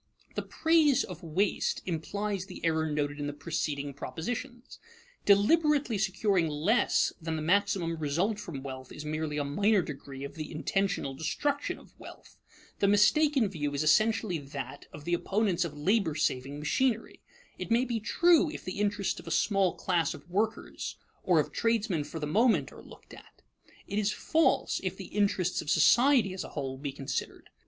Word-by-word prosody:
The - - -2
praise 320 -4 +3
of 180 -4 -8
waste 180 +5 0
implies 195 +3 -3
the 180 -3 -7
error 160 -1 +1
noted 145 0 -2
in 145 - -2
the 145 - -4
preceding 145 -1 -3
propositions. 240 - -6 0.5
Deliberately 270 +3 +4
securing 195 -2 +1
less 160 +11 +2
than 165 0 -3
the 155 - -3
maximum 185 -1 +1
result 170 +8 0
from 150 -9 -7
wealth 130 -1 -8
is 150 - -8
merely 155 0 -2
a 145 - 0
minor 200 +8 +2
degree 135 -2 -8
of 140 - -6
the 155 -2 -7
intentional 180 -2 -1
destruction 285 - -2
of - - -18
wealth. - - -13 0.4
The 200 - +3
mistaken 245 +6 +4
view 150 -6 -3
is 140 - 0
essentially 215 +2 +2
that 140 -2 -7
of 150 0 -11
the 175 - -1
opponents 190 0 +1
of 150 -3 -7
labor 185 0 +1
saving 140 -2 -1
machinery. 225 - -1 0.4
It - - -5
may 235 +3 +3
be 235 -2 -2
true, 335 - +4
if - - -8
the 185 +2 -5
interests 205 -1 0
of - - -13
a - - -3
small 195 +2 +2
class 170 -5 0
of 145 - -14
workers 210 +5 -2 0.2
or - - +3
of - - -1
tradesmen 220 -9 0
for 160 +2 -7
the 150 - -2
moment 225 +10 +2
are - - -12
looked - - -15
at; - - -16 0.4
it 205 - -2
is 210 0 +1
false, 320 +8 +1
if - - -3
the - - -8
interests 200 -3 +1
of 150 - -7
society 235 - +5
as 185 - -4
a - - -8
whole 135 -3 -5
be 140 0 -4
considered. 135 -1 -5
180 Hz, 175 wpm, -29 LUFS, 150-215 Hz, 0.5 s, society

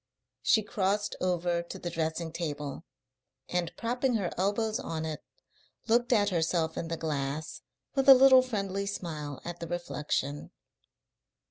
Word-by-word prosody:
She 220 - +4
crossed 205 +1 0
over 175 -1 +1
to 170 - -8
the 175 - -5
dressing 160 0 -2
table, 150 -2 -4 0.6
and, 175 -2 -1
propping 245 +2 0
her 195 -5 -1
elbows 215 +4 0
on 160 -11 -4
it, 155 -1 -4 0.7
looked 240 +2 +3
at 205 -4 +4
herself 165 -2 0
in 165 - -3
the 165 0 -3
glass, 150 -1 -3 0.3
with 270 -1 +3
a 270 - +13
little 260 0 +8
friendly 200 -5 -2
smile 155 -7 -5
at 175 0 -5
the 170 - -5
reflection. 150 -4 -3
175 Hz, 140 wpm, -30 LUFS, 160-210 Hz, 0.7 s, a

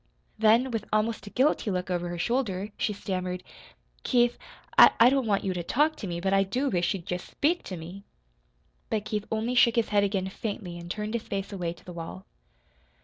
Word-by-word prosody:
Then, 225 +4 +4
with 225 -2 -2
almost 215 0 0
a - - -5
guilty 260 -1 +1
look 185 -1 -2
over 175 0 -1
her 175 - -4
shoulder, 205 -1 -1
she - - -1
stammered: 185 -2 -4 0.6
"Keith, 240 -1 +3 0.4
I 240 +3 +8
don't 270 -3 +1
want 200 -2 +1
you 190 - -1
to 175 - -3
talk 300 - +2
to 205 - -5
me, 170 -1 -3
but 190 +2 0
I 195 - +5
do 250 +9 0
wish 175 -1 +1
you'd 175 -4 -7
just 180 0 -4
SPEAK 335 +5 +1
to 185 - -5
me." 175 +5 -9 0.9
But 215 -1 -1
Keith 210 -1 -2
only 220 +3 -1
shook 240 -1 +5
his 230 -2 +1
head 205 -1 +3
again 195 -2 0
faintly 190 -4 -5
and 170 0 -9
turned 210 +3 -3
his 235 - -1
face 200 0 -4
away 175 -3 -3
to 175 - -21
the 180 - -8
wall. 170 +3 -7
200 Hz, 205 wpm, -27 LUFS, 180-230 Hz, 0.9 s, I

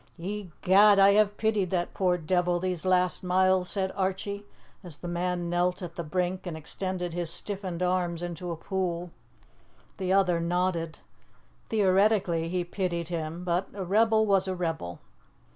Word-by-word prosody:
"Egad, 195 +2 +3
I 195 0 +7
have 205 0 +3
pitied 215 -4 +1
that 175 -1 -1
poor 180 -2 +1
devil 175 +1 +1
these 185 0 -2
last 180 -2 +2
miles," 185 0 +2
said 190 -2 0
Archie, 200 +1 -2 0.4
as 170 -5 -8
the 175 - -7
man 175 0 -2
knelt 180 +2 0
at 170 -1 -7
the 170 - -4
brink 180 +3 -2
and 165 -2 -4
extended 180 +2 -4
his 175 -1 -2
stiffened 190 -2 -3
arms 175 -2 0
into 175 0 -5
a 170 - -2
pool. 175 0 -3 0.9
The 185 -2 -2
other 185 -3 +3
nodded. 170 -1 -1 0.7
Theoretically 195 -5 +2
he 180 0 -1
pitied 175 -2 -3
him, 165 0 -4
but 180 +1 0
a 195 -2 -4
rebel 220 +3 +3
was 195 -2 +2
a 185 - -2
rebel. 165 - -4
180 Hz, 155 wpm, -28 LUFS, 175-190 Hz, 0.9 s, I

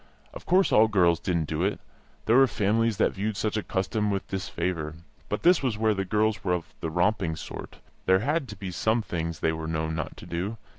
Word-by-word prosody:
Of - - -10
course 185 +2 +4
all 110 +1 +6
girls 90 -5 +3
didn't 85 -3 0
do 80 +2 -2
it; 100 +2 0 0.5
there 115 - +4
were 135 0 +7
families 110 0 +1
that - - +3
viewed 105 +1 -2
such 110 -1 -1
a 110 - 0
custom 105 +3 -1
with 100 -1 -2
disfavour. 85 -4 -3 0.3
But 105 - -2
this 175 0 +5
was 125 -6 -1
where 110 0 +2
the 95 -1 -2
girls 105 +2 +1
were 90 -2 +1
of 90 -2 -4
the 80 - -3
romping 85 -1 +1
sort; - - -8 0.3
there 95 0 +5
had 145 +3 0
to 105 - -8
be 95 -1 -6
some 110 +5 +1
things 85 -3 -4
they 80 - +2
were 80 0 -5
known 80 0 -2
not 80 - -4
to - - -10
do. 95 +7 -3
100 Hz, 225 wpm, -27 LUFS, 85-110 Hz, 0.5 s, were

